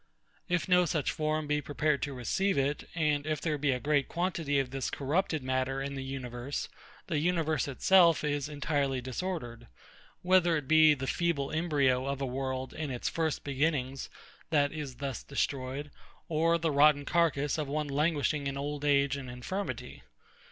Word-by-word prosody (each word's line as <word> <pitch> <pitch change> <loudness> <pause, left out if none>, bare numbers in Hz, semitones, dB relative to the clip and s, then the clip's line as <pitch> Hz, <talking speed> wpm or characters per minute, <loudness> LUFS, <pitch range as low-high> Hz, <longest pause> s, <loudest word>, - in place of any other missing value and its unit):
If 180 0 0
no 180 -1 +5
such 155 -4 0
form 155 0 -1
be 150 0 0
prepared 145 +1 0
to 140 - -3
receive 190 - 0
it, 140 +2 -1
and 150 -3 +1
if 155 -1 0
there 155 -3 -1
be 145 0 +1
a 125 -1 +1
great 145 0 +1
quantity 170 -5 -1
of 135 -2 0
this 135 -1 -2
corrupted 155 +1 -1
matter 130 +1 -1
in 140 +1 -3
the 135 -1 -4
universe, 130 0 -5 0.4
the 155 -4 -1
universe 160 -2 +1
itself 170 +4 +4
is 145 -1 -1
entirely 145 -2 -1
disordered; 125 -3 -5 0.6
whether 180 -2 +4
it 145 -3 -5
be 155 0 +6
the 135 -1 -4
feeble 145 -2 0
embryo 140 -5 +1
of 140 0 -2
a 135 - -1
world 130 0 -3
in 155 -2 -4
its 125 -2 -2
first 160 -2 -1
beginnings 135 -2 -1 0.4
that 145 -2 +2
is 150 -5 -6
thus 135 -1 -4
destroyed, 140 0 -3 0.4
or 165 +1 +2
the 165 -1 0
rotten 145 0 +5
carcass 160 -3 +1
of 150 - -2
one 150 +1 -2
languishing 145 0 0
in 135 0 -3
old 145 +1 -4
age 140 -1 +3
and 135 -3 -6
infirmity. 125 - -5
145 Hz, 170 wpm, -30 LUFS, 135-155 Hz, 0.6 s, be